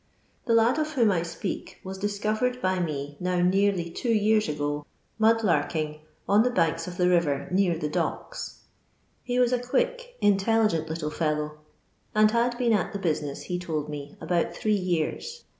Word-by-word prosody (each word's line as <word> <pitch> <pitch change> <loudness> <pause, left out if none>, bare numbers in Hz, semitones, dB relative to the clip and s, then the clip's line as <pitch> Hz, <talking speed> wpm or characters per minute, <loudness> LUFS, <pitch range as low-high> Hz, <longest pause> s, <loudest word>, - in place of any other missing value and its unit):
The 230 - +2
kd 230 +6 +4
of 310 0 -1
whom 235 -7 +4
I 175 -3 +1
speak 170 +3 -5
was 190 0 -6
discovered 215 +5 -1
by 185 -5 0
me 145 -4 -3
now 180 0 -1
nsariy 180 -1 +2
two 240 - -3
years 215 -1 +3
ago 145 0 -2
" - - -42
mud 225 +1 +4
larking" 155 -5 0 0.3
on 205 +2 +5
the 250 - +3
banks 165 -6 0
of 175 -1 -7
the 180 - +3
river 170 -6 +2
near 180 -3 +2
the 150 - -2
docks. - - -4 0.6
He 245 0 -2
was 250 0 +3
a 250 - +2
quick, - - -1
intelligent 205 -4 +2
little 160 -1 -3
fellow, 150 -1 -2 0.6
and 215 0 +5
had 240 +1 +1
been 240 -2 +2
at 200 -4 0
the 200 - -3
bosbess, 150 -6 -2
he 180 -1 -3
told 155 -4 -3
me, 145 -1 -7
about 170 +1 0
three 215 - 0
years. 185 - -2
185 Hz, 175 wpm, -26 LUFS, 160-225 Hz, 0.6 s, on